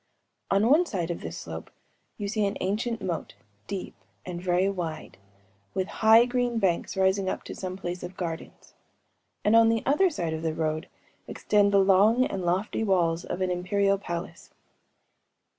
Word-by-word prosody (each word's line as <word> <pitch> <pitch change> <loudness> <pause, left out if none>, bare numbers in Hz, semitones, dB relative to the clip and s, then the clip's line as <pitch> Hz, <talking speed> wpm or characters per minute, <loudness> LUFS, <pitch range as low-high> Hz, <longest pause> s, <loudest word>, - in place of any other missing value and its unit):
On 200 +3 +3
one 320 +7 +4
side 175 - -2
of 170 - -5
this - - -6
slope - - -7 0.5
you 205 - -3
see 215 +1 0
an 200 - -3
ancient 215 +3 -2
moat, 175 -3 -4 0.3
deep 195 -2 -5 0.3
and 175 -1 -5
very 180 +1 +2
wide, 175 - -5 0.6
with 190 0 0
high 225 +2 +7
green 245 -1 0
banks 190 -2 0
rising 190 0 +2
up - - -4
to - - -7
some 185 -1 -5
place 180 -2 -5
of 180 +1 -8
gardens;‚ÄĒand 175 +4 -5
on 230 0 +7
the 225 -1 +1
other 330 +8 +4
side 170 - -3
of 160 - -4
the 160 -1 -2
road 155 0 -2 0.4
extend 205 -1 +2
the 200 - +4
long 200 +6 +5
and 195 - -3
lofty 185 +5 0
walls 175 -4 +1
of 185 - -5
an 185 -1 +1
imperial 195 +2 +1
palace. 170 -2 -6
190 Hz, 165 wpm, -27 LUFS, 175-215 Hz, 0.6 s, high